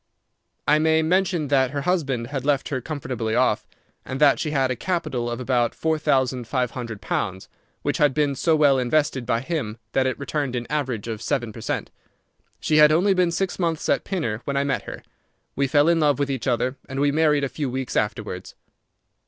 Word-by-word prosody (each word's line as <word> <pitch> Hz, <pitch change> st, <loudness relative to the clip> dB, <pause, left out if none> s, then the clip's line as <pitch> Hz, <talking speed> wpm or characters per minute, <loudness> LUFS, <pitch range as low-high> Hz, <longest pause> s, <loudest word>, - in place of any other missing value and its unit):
I 150 Hz, +1 st, +5 dB
may 160 Hz, 0 st, +3 dB
mention 175 Hz, -3 st, +1 dB
that 135 Hz, -2 st, +3 dB
her 140 Hz, +1 st, -3 dB
husband 140 Hz, -8 st, 0 dB
had 135 Hz, -3 st, -2 dB
left 140 Hz, -1 st, +1 dB
her 130 Hz, -3 st, -2 dB
comfortably 125 Hz, -6 st, -3 dB
off, -, -, +2 dB, 0.4 s
and 130 Hz, -, -5 dB
that 145 Hz, -2 st, +5 dB
she 155 Hz, -, -1 dB
had 135 Hz, -3 st, +1 dB
a -, -, -1 dB
capital 135 Hz, -8 st, -2 dB
of 120 Hz, 0 st, -4 dB
about 125 Hz, -2 st, 0 dB
four 160 Hz, -1 st, 0 dB
thousand 130 Hz, -5 st, +1 dB
five 125 Hz, -1 st, 0 dB
hundred 115 Hz, -5 st, -6 dB
pounds, 95 Hz, -1 st, -3 dB, 0.4 s
which -, -, -1 dB
had 145 Hz, -3 st, +3 dB
been 145 Hz, -2 st, +2 dB
so 160 Hz, +4 st, +2 dB
well 145 Hz, -3 st, +4 dB
invested 130 Hz, -1 st, 0 dB
by 115 Hz, -1 st, +1 dB
him 130 Hz, -8 st, -3 dB
that 130 Hz, -1 st, +2 dB
it 130 Hz, -, -2 dB
returned 140 Hz, -1 st, -2 dB
an 120 Hz, -1 st, -3 dB
average 130 Hz, -8 st, -2 dB
of 110 Hz, -2 st, -4 dB
seven 120 Hz, -4 st, -2 dB
per 115 Hz, -, -9 dB
cent. -, -, -3 dB, 0.7 s
She 155 Hz, -, +1 dB
had 150 Hz, 0 st, +7 dB
only 185 Hz, +6 st, +4 dB
been 180 Hz, -2 st, +2 dB
six 185 Hz, +3 st, -2 dB
months 165 Hz, -3 st, -1 dB
at -, -, +2 dB
Pinner 120 Hz, -, -2 dB
when 140 Hz, -1 st, -1 dB
I 140 Hz, -, +2 dB
met 140 Hz, -1 st, -1 dB
her; -, -, -8 dB, 0.5 s
we 140 Hz, 0 st, +1 dB
fell 145 Hz, +2 st, +4 dB
in 170 Hz, -1 st, +4 dB
love 145 Hz, -4 st, +3 dB
with 140 Hz, -1 st, -1 dB
each 130 Hz, -2 st, -3 dB
other, 125 Hz, +2 st, 0 dB
and 135 Hz, 0 st, -4 dB
we 145 Hz, 0 st, +3 dB
married 150 Hz, -1 st, +3 dB
a -, -, +1 dB
few 140 Hz, 0 st, -3 dB
weeks 130 Hz, 0 st, -4 dB
afterwards. 105 Hz, -3 st, -2 dB
140 Hz, 210 wpm, -23 LUFS, 125-155 Hz, 0.7 s, had